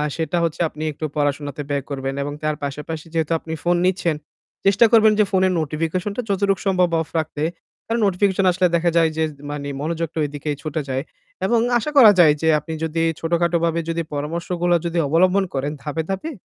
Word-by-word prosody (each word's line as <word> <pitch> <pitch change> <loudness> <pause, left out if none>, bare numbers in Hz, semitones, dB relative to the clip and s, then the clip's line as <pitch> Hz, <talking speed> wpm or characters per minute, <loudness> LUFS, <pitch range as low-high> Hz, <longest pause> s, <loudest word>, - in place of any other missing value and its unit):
সেটা 165 +1 -1
হচ্ছে 165 -1 -1
আপনি 155 +1 -7
একটু 155 - -5
পড়াশোনাতে 145 -1 -1
ব্যয় 140 -1 -1
করবেন 135 -1 -3
এবং 145 - -4
তার 155 0 0
পাশাপাশি 150 +3 -5
যেহেতু 160 -1 -1
আপনি 160 - -7
ফোন 175 0 +3
নিচ্ছেন 175 -3 +1 0.5
চেষ্টা 200 +4 +5
করবেন 220 -2 +6
যে - - +7
ফোনের 190 -1 +3
নোটিফিকেশন 160 +5 -2
টা 250 - +1
যতটুক 195 -1 +1
সম্ভব 185 -2 +3
অফ 160 - -5
রাখতে। 155 -1 -4 0.4
কারণ 230 +1 -1
নোটিফিকেশন 195 0 +1
আসলে 180 +1 +2
দেখা 170 +1 +2
যায় 165 -1 +4
যে, 160 - +2 0.3
মানে 145 -1 -5
মনোযোগটা 165 +1 -3
এদিকে 145 +1 -6
ছুটে 155 0 -3
যায়। 130 +1 -1 0.4
এবং 235 - +3 0.2
আশা 300 - -3
করা 230 -6 +10
যায় 155 -4 +7
যে 160 - +1
আপনি 160 +2 -7
যদি 160 0 -1 0.2
ছোটখাটো 170 +1 +1
ভাবাবে 170 0 +1
যদি 165 0 -1
পরামর্শগুলো 170 +4 -1
যদি 170 0 -2
অবলম্বন 185 +6 +3
করেন, 140 +1 -1
ধাপে, 155 +2 -2
ধাপে 195 +12 -3
165 Hz, 185 wpm, -21 LUFS, 150-185 Hz, 0.5 s, করা